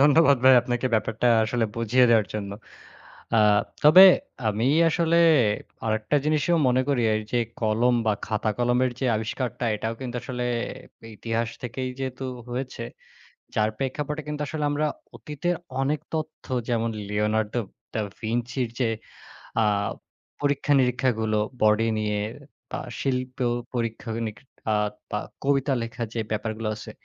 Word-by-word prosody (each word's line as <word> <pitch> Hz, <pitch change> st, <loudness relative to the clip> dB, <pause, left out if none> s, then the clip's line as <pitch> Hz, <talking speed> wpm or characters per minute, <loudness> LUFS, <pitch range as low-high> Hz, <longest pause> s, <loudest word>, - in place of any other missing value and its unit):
ধন্যবাদ 145 Hz, 0 st, +6 dB
ভাই 130 Hz, 0 st, +9 dB
আপনাকে 120 Hz, +1 st, -1 dB
ব্যাপারটা 110 Hz, +2 st, 0 dB, 0.2 s
আসলে 115 Hz, +1 st, 0 dB
বুঝিয়ে 115 Hz, +2 st, +3 dB
দেওয়ার 110 Hz, -3 st, +4 dB
জন্য। 100 Hz, -2 st, -3 dB, 0.9 s
আ -, -, +5 dB, 0.4 s
তবে 155 Hz, +5 st, +9 dB, 0.5 s
আমি 110 Hz, +3 st, 0 dB, 0.2 s
আসলে 165 Hz, 0 st, +2 dB, 0.7 s
আরেকটা 110 Hz, +6 st, +1 dB
জিনিসও 155 Hz, +3 st, +2 dB
মনে 125 Hz, +1 st, +3 dB
করি 135 Hz, -4 st, +2 dB
এই 110 Hz, -, -1 dB
যে 120 Hz, -, +3 dB, 0.2 s
কলম 115 Hz, +2 st, +2 dB
বা 110 Hz, -, +4 dB
খাতা-কলমের 120 Hz, +4 st, +1 dB
যে 135 Hz, -, +1 dB
আবিষ্কারটা 115 Hz, +3 st, -3 dB
এটাও 110 Hz, +2 st, -3 dB
কিন্তু 125 Hz, -2 st, -4 dB
আসলে 125 Hz, -2 st, -4 dB, 0.7 s
ইতিহাস 115 Hz, +1 st, -2 dB
থেকেই 130 Hz, +1 st, -3 dB
যেহেতু 130 Hz, 0 st, -4 dB, 0.3 s
হয়েছে 125 Hz, -1 st, -4 dB, 0.7 s
যার 110 Hz, 0 st, +2 dB
প্রেক্ষাপটে 150 Hz, +4 st, -3 dB
কিন্তু 150 Hz, 0 st, -4 dB
আসলে 155 Hz, 0 st, -3 dB
আমরা 145 Hz, +1 st, 0 dB, 0.3 s
অতীতের 150 Hz, +9 st, -2 dB, 0.3 s
অনেক 145 Hz, +3 st, 0 dB, 0.2 s
তথ্য 155 Hz, 0 st, -5 dB, 0.2 s
যেমন 115 Hz, -1 st, +1 dB, 0.2 s
'লিওনার্দো 105 Hz, +2 st, 0 dB, 0.3 s
দা 110 Hz, -, 0 dB, 0.2 s
ভিঞ্চি' 120 Hz, +3 st, -1 dB, 0.2 s
যে 120 Hz, -3 st, +2 dB, 0.7 s
আ -, -, +3 dB, 0.8 s
পরীক্ষা 145 Hz, 0 st, +1 dB
নিরীক্ষাগুলো 125 Hz, -4 st, +1 dB, 0.2 s
বডি 110 Hz, +1 st, +4 dB
নিয়ে 105 Hz, -1 st, -1 dB, 0.5 s
বা -, -, -3 dB, 0.2 s
শিল্প 130 Hz, -1 st, -2 dB, 0.4 s
পরীক্ষা 115 Hz, -1 st, -3 dB
ও -, -, -3 dB
নিক 105 Hz, -1 st, -6 dB, 0.4 s
আ -, -, +3 dB, 0.4 s
বা -, -, -1 dB, 0.3 s
কবিতা 140 Hz, 0 st, +2 dB
লেখা 115 Hz, +1 st, -5 dB
যে 115 Hz, -, -1 dB
ব্যাপারগুলো 110 Hz, 0 st, -2 dB
আছে। 105 Hz, -, -9 dB
120 Hz, 135 wpm, -25 LUFS, 110-135 Hz, 0.9 s, ভাই